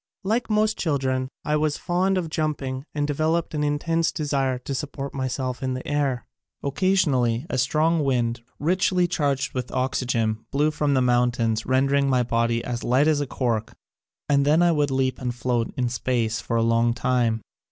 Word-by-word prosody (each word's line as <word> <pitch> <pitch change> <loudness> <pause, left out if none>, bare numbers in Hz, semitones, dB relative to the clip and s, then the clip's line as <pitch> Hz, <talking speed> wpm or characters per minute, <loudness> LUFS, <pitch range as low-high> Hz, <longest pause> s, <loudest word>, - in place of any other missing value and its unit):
Like 225 +5 0
most 215 0 +1
chil 155 -5 +1
dren 130 -1 -1 0.2
I 150 - +1
was 150 -1 0
fond 185 +2 +1
of 165 -4 -3
jumping 140 -4 -2
and 145 -1 0
developed 155 +4 0
an 150 -1 -1
intense 165 +3 0
desire 135 -4 -1
to 125 +2 -6
support 140 +1 -5
myself 130 -1 -3
in 130 -1 -1
the 130 - -6
air. 140 -4 0 0.4
Occasionally 140 -7 +1
a 130 - 0
strong 155 +5 +2
wind 120 -3 0 0.2
richly 180 +3 +2
charged 140 -6 -1
with 125 -1 -4
oxygen 120 -4 -1
blew 150 +2 +1
from 150 -2 0
the 130 - +3
moun 125 0 +3
tains 115 -2 -1
rendering 135 +2 +2
my 125 -2 +3
body 115 0 0
as 120 -1 -4
light 130 +5 +3
as 150 -2 +2
cork 115 -4 -1 0.5
and 140 -1 +3
then 155 +4 +4
I 175 - +4
would 150 -3 +1
leap 130 -1 0
and 125 -1 -2
float 120 -1 -1
in 125 -1 +1
space 120 -2 -1
for 115 - -1
a 115 - +2
long 115 +1 +2
time. 120 -4 +1
135 Hz, 180 wpm, -24 LUFS, 125-150 Hz, 0.5 s, then